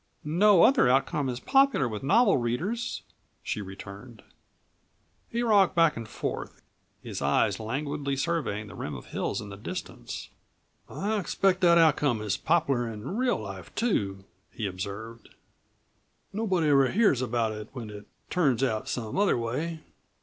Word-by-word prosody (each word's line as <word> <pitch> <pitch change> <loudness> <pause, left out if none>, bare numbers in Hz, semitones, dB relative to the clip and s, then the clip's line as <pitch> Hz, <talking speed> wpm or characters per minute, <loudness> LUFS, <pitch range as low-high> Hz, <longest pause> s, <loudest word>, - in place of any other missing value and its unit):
"No 180 +4 +5
other 260 - +5
outcome 135 +1 +1
is 125 -1 -3
popular 270 - +3
with 110 -3 -5
novel 205 - +4
readers," 165 - -2 0.4
she 105 - -3
returned. 100 +4 -10 1.1
He 235 +1 -1
rocked 205 -5 +4
back 165 -2 +4
and 115 -1 -6
forth, - - -5 0.4
his - - -6
eyes - - +2
languidly 140 +5 -2
surveying 135 -8 -1
the 105 - -11
rim - - -5
of - - -9
hills - - -3
in 105 - -8
the 100 - -8
distance. 180 - -7 0.6
"I 210 +2 -1
expect 190 0 +1
that 170 -1 +6
outcome 145 -7 +3
is 105 -3 -1
popular 140 -8 +1
in 110 - -6
real 250 +1 +1
life 95 -4 -8
too," 100 - 0 0.3
he 110 - -4
observed. 100 +4 -6 1.0
"Nobody 190 -7 +1
ever 135 -2 +5
hears 200 - +3
about 120 -2 0
it 105 0 -7
when 115 -5 -7
it 105 0 -10 0.2
turns 135 -8 +2
out 110 -5 -1
some 115 - -3
other 205 -8 +3
way." 150 +8 -3
135 Hz, 150 wpm, -28 LUFS, 110-180 Hz, 1.1 s, that